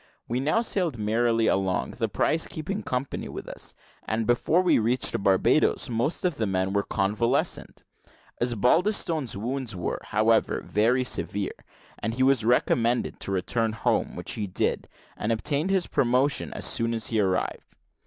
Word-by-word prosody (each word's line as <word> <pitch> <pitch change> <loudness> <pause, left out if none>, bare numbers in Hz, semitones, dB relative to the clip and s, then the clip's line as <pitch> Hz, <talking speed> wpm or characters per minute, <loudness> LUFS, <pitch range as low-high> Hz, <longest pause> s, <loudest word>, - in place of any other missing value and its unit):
We 120 +2 -1
now 155 - +2
sailed 180 - 0
merrily 115 +2 +1
along, 95 -3 0
the - - 0
prize 160 +1 +1
keeping 190 +7 -4
company 130 -3 -3
with - - -7
us; - - -6 0.3
and, 110 +1 -1
before 150 +10 +2
we 180 - +4
reached 115 -1 +1
Barbadoes, 115 +8 +2
most 120 - -1
of 175 -5 0
the 110 - 0
men 95 0 0
were 100 - +2
convalescent. 105 +7 -1 0.6
Osbaldistone's 135 - +1
wounds 120 0 -3
were, 90 - -3
however, 110 +2 +2
very 115 +5 +2
severe; 100 -5 -2 0.5
and 115 +2 -3
he 130 - +1
was 130 -4 +3
recommended 120 0 +1
to - - -3
return 110 +4 0
home, 110 - 0
which - - -4
he 105 - -2
did, 90 - -1 0.3
and 105 - -2
obtained 145 - 0
his 190 -2 +2
promotion 130 +3 +1
as - - -2
soon 115 0 +1
as 115 - -2
he 110 - 0
arrived. 95 -2 -1
120 Hz, 155 wpm, -26 LUFS, 105-140 Hz, 0.6 s, we